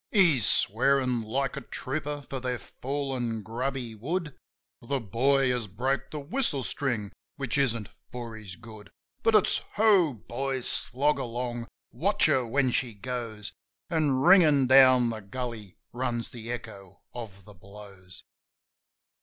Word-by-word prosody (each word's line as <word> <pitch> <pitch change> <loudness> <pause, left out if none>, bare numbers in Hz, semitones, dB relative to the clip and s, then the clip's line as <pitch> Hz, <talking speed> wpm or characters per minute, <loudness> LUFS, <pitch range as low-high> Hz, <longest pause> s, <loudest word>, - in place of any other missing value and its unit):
He's 170 - +4
swearin' 125 +2 +2
like 125 +4 -2
a - - -5
trooper, 145 +1 -4
for 135 - -4
they're 125 -1 -2
falling 130 -5 -4
grubby 125 +2 -3
wood; 150 - -3 0.5
The 135 +3 -1
boy 130 +5 +2
has 120 -3 -2
broke 130 +8 -2
the 155 - -5
whistle 145 - 0
string, 115 -9 -2 0.2
which 135 -1 -2
isn't 115 -6 0 0.2
for 120 -2 -6
his 105 -4 -9
good. 110 -2 -13 0.3
But 225 - +3
it's: 210 - +4 0.2
Ho, 200 -8 +4
boys! 130 +4 -3
Slog 140 +3 0
along! 120 -1 -4 0.2
Watch - - +2
her 130 - +3
when 130 +2 +2
she 120 -3 -1
goes! 115 -1 -5 0.4
An' 155 -4 +2
ringin' 155 -5 +6
down 130 -2 +6
the 110 - -5
gully 110 -2 -6 0.2
runs 120 -2 -2
the 115 -1 -7
echo 105 -6 -8
of 105 -5 -9
the 105 - -13
blows. 100 -1 -12
125 Hz, 135 wpm, -28 LUFS, 115-140 Hz, 0.5 s, ringin